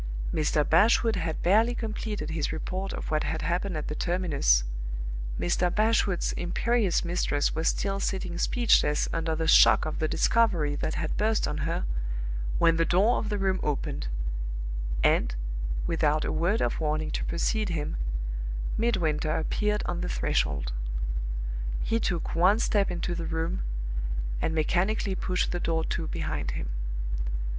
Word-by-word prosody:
Mr. 150 -1 +1
Bashwood 220 +6 +4
had 165 -3 -2
barely 220 +7 +4
completed 215 -7 -3
his 160 -2 -1
report 185 +5 -3
of - - -5
what 155 0 +2
had 160 - -2
happened 180 0 -1
at 150 - -4
the - - -3
terminus; 155 - +2 0.8
Mr. 175 +1 +1
Bashwood's 210 -2 +2
imperious 200 +1 +1
mistress 170 -4 0
was 160 +1 -1
still 195 -1 0
sitting 185 -3 -2
speechless 220 -12 +3
under 165 -1 0
the 160 +1 -1
shock - - +7
of 155 - -3
the 155 - +1
discovery 175 -8 +2
that 155 - -2
had 155 -1 -2
burst 220 +1 +2
on - - -3
her - - -1 0.7
when 165 -1 +4
the 165 - +3
door 195 +8 +3
of 215 - -3
the 210 - -1
room 190 -1 +1
opened; 145 - -2 1.0
and, - - +3 0.5
without 155 -2 +1
a - - -1
word 175 +8 +1
of - - -1
warning 155 0 -1
to - - -2
proceed 215 +5 0
him, 155 - -2 0.8
Midwinter 165 -9 +1
appeared 210 +6 0
on 175 - -2
the - - -2
threshold. - - 0 1.1
He 230 - +1
took 175 -6 -1
one 185 +5 +4
step 205 -3 +2
into 175 0 -2
the 170 -1 -3
room, 160 - -2 0.8
and 160 - 0
mechanically 190 +6 +1
pushed 185 -1 -1
the 175 - -1
door 165 -1 0
to - - -2
behind - - -3
him. - - -4
175 Hz, 150 wpm, -28 LUFS, 155-200 Hz, 1.1 s, shock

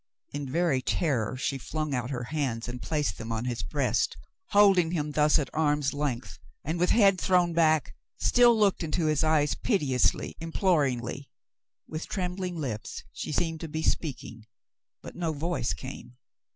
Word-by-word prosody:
In 140 -2 -5
very 165 -4 +1
terror, 130 -5 0
she 135 +1 -2
flung 155 +2 -3
out 125 -1 -2
her 125 -3 -3
hands 125 -4 -2
and 125 0 -6
placed 145 - -1
them 115 0 -6
on 115 +1 -2
his 120 -3 -2
breast, 70 - 0 0.3
holding 195 - +5
him 150 -3 -1
thus 150 +1 +4
at 145 -4 -1
arm's 150 -2 +1
length, 140 -4 -3 0.2
and 160 +3 -2
with 180 - +2
head 195 -5 +4
thrown 180 -2 +3
back, 160 -2 +2 0.2
still 240 -2 +5
looked 205 -3 +2
into 165 0 -1
his 155 -2 +2
eyes 155 -2 +3
piteously, 145 - 0
imploringly. 145 - 0 0.6
With 155 +1 -5
trembling 180 -1 -3
lips, 125 -10 -5
she - - -5
seemed 165 +1 -1
to 165 - -5
be 160 +1 -4
speak 150 -4 -1
ing, 115 -1 -11 0.6
but - - -9
no 170 -2 -2
voice 155 - -1
came. 95 +8 -8
150 Hz, 165 wpm, -28 LUFS, 130-170 Hz, 0.6 s, holding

